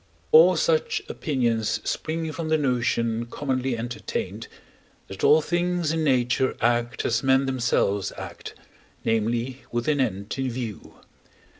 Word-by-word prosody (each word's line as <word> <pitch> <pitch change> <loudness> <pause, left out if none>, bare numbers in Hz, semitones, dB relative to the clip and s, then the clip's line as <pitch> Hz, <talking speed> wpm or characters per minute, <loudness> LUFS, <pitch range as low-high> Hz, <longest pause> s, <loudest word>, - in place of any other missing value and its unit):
All 470 +1 +8
such 470 -3 +1
opinions 120 -7 0
spring 160 0 -2
from 160 +1 -4
the 160 - +3
notion 120 -4 0
commonly 130 -1 -2
entertained, 120 +2 -4 0.6
that 95 - -8
all 155 +1 +6
things 175 -1 0
in 160 -1 0
nature 130 -2 +1
act 120 +1 0
as 115 0 +1
men 135 0 +3
themselves 115 -6 0
act, - - -8 0.5
namely, 115 +4 0
with 120 0 -2
an 150 -2 +2
end 100 -4 -2
in 130 -1 0
view. 120 -4 -6
130 Hz, 130 wpm, -25 LUFS, 115-155 Hz, 0.6 s, All